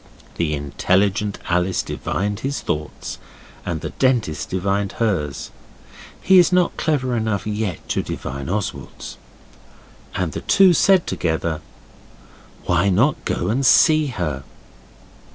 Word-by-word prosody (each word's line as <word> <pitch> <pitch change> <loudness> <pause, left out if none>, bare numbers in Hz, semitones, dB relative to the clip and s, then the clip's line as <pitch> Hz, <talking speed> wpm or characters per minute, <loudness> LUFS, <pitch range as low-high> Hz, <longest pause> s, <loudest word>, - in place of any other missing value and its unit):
The 80 -3 0
intelligent 95 +8 0
Alice 90 +2 +1
divined 105 +1 -3
his 140 +3 -3
thoughts, 75 0 -4 0.4
and 85 -4 -3
the - - -5
Dentist 120 - 0
divined 100 +2 -1
hers 90 - -2 0.7
he 190 -1 +6
is 175 - +4
not 180 -1 +2
clever 130 -6 0
enough 110 -4 -1
yet 105 -5 -3
to - - 0
divine 70 +3 -5
Oswald's 105 +1 -4 1.0
and 90 -4 -1
the - - -5
two 195 -3 +5
said 190 +1 +4
together 80 -1 -2 1.0
'Why 90 +3 +2
not 120 +11 +2
go 90 - -1
and 130 +6 0
see 155 +3 +5
her? 85 - -3
100 Hz, 120 wpm, -21 LUFS, 85-130 Hz, 1.0 s, he